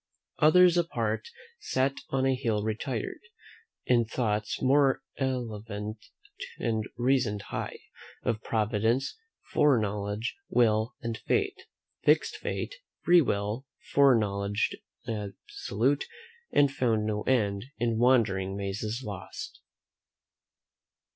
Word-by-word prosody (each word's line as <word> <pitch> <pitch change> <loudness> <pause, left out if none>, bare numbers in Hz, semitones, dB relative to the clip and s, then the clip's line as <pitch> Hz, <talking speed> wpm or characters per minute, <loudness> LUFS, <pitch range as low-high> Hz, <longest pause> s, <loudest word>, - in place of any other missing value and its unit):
"Others 175 +3 +6
apart 175 - -1 0.3
sat 135 +1 0
on 135 0 +1
a 135 - +3
hill 110 -5 0
retired, 110 +2 -3 0.7
In 120 -2 +4
thoughts 110 -2 -1
more 135 0 +3
elevate, 110 -5 -4 0.5
and 110 -2 -1
reasoned 120 -5 +1
high - - -3 0.5
Of 110 -2 -1
providence, 110 +4 0 0.4
fore 145 -4 +5
knowledge, 105 - -2
will, 110 0 +2
and 115 -1 -2
fate, 405 -1 0 0.4
Fixed - - +3
fate, - - -4 0.3
free 175 0 +7
will, 105 +1 -1 0.3
fore 140 -2 +6
knowledge 100 -1 0 0.3
absolute, 110 +4 -2 0.5
And 145 -1 +4
found 115 -6 +1
no 105 -1 -1
end, 105 -5 +1
in 115 -1 0
wandering 100 -6 +3
mazes 105 +5 -3
lost." 100 -3 -7
115 Hz, 100 wpm, -29 LUFS, 105-130 Hz, 0.7 s, free